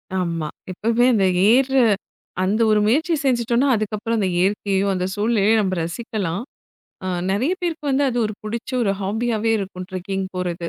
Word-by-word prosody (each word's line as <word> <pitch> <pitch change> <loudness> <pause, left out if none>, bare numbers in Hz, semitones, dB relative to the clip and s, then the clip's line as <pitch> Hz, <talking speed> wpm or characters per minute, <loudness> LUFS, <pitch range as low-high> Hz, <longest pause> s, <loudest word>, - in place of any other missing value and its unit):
ஆமா. 170 -4 -1 0.2
எப்பவுமே 230 +6 +1
அந்த 200 -4 +3 0.3
ஏர்ற 265 +2 +3 0.7
அந்த 210 +5 +1
ஒரு 215 - +4
முயற்சி 315 +10 +2
செஞ்சுட்டோம்ன்னா, 240 +1 +2
அதுக்கப்புறம் 215 +1 -2
அந்த 195 - +1
இயற்கையும் 195 +1 +1
அந்த 180 -1 -1
சூழலையும் 215 0 +2
நம்ப 190 -2 -1
ரசிக்கலாம். 195 0 -3 0.6
அ - - -3 0.2
நெறைய 240 - +1
பேருக்கு 330 -3 -3
வந்து 275 +1 +2
அது 245 -1 -2
ஒரு 210 - -5
புடிச்ச 225 +3 -5
ஒரு 200 -3 +2
ஹாபியாவே 220 +2 -1
இருக்கும், 185 -2 -6
ட்ரெக்கிங் 190 +1 -3
போறது. 175 -1 -3
215 Hz, 150 wpm, -21 LUFS, 190-235 Hz, 0.7 s, ஒரு